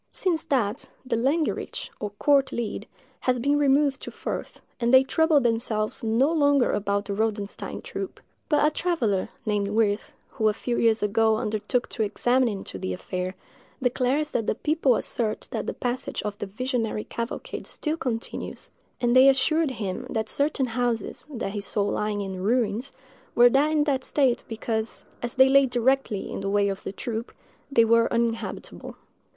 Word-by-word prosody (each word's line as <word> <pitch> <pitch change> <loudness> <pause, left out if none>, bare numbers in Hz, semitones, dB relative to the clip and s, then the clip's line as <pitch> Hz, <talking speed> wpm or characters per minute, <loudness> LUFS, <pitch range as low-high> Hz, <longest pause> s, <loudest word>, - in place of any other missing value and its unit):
Since 340 -4 -1
that, 240 -3 0 0.2
the 250 -2 0
landgericht, 280 +7 -1
or 210 - -3
court 280 +1 +3
leet, 235 -3 -4 0.3
has 255 -1 +1
been 285 +4 +2
removed 280 -1 +3
to - - -6
Furth, - - -5 0.2
and 235 -1 +1
they 260 0 +8
trouble 320 +2 +3
themselves 225 -3 -1
no 230 +7 +3
longer 285 -5 +3
about 200 0 0
the 200 - -3
Rodenstein 210 -1 -3
troop; 390 - -6 0.3
but 300 -2 +4
a 305 - +3
traveller, 265 - 0 0.2
named 205 -2 0
Wirth, 210 0 0
who 220 -1 +1
a 210 - -1
few 240 +1 -2
years 225 -2 +3
ago 220 +2 +3
undertook 215 +3 -1
to - - -4
examine 245 +4 +2
into 195 - -6
the 95 0 -3
affair, 180 - -4 0.4
declares 260 +4 +1
the 225 -2 0
people 300 -5 +3
assert 220 -1 -2
that - - -3
the - - 0
passage 245 0 -3
of 210 -1 -3
the 205 - -4
visionary 225 0 -2
cavalcade 235 - -5
still 310 0 -2
continues; 240 -7 -5 0.3
and 240 0 +2
they 260 +1 +8
assured 310 +4 +2
him 205 -7 -4
that 220 -1 -2
certain 285 -2 +1
houses, 240 -1 -2
that 235 -8 -4
he 205 0 -4
saw 200 +1 -1
lying 210 0 -1
in 190 -2 -5
ruins, 230 +4 0 0.4
were 240 - +7 0.2
in 305 -1 +2
that 275 -3 0
state 265 -5 +2
because, 220 0 -3 0.2
as 240 +1 -4
they 260 0 +7
lay 275 0 +5
directly 245 -3 0
in - - -4
the 195 - -2
way 200 0 +2
of 195 -1 -4
the - - -5
troop, 230 +2 -5 0.4
they 230 -4 +5
were 230 0 +4
uninhabitable. 230 -1 -3
235 Hz, 170 wpm, -26 LUFS, 210-270 Hz, 0.4 s, they